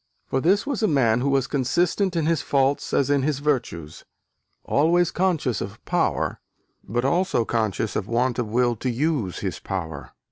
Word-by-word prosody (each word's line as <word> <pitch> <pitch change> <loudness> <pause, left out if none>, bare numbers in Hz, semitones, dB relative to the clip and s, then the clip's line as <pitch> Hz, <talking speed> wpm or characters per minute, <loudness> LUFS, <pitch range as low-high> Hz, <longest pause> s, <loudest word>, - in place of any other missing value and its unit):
For 130 - -1
this 195 +7 +3
was 275 -5 -2
a 215 - +3
man 125 - +2
who 140 - +1
was 135 -2 +2
consistent 175 - 0
in 165 -2 +1
his 165 -1 +1
faults 140 0 +1
as 140 0 +2
in 140 -1 +3
his 145 0 0
virtues: 125 - -2 0.6
"always 170 +4 +2
conscious 160 - 0
of 100 +3 -6
power, - - 0 0.4
but 120 +5 -2
also 145 -5 +1
conscious 110 -2 -1
of 100 - -2
want 120 +2 0
of 120 - -1
will 120 +2 +1
to 130 - -2
use 125 - -1
his - - -3
power." 80 -7 -5
135 Hz, 175 wpm, -24 LUFS, 115-160 Hz, 0.6 s, this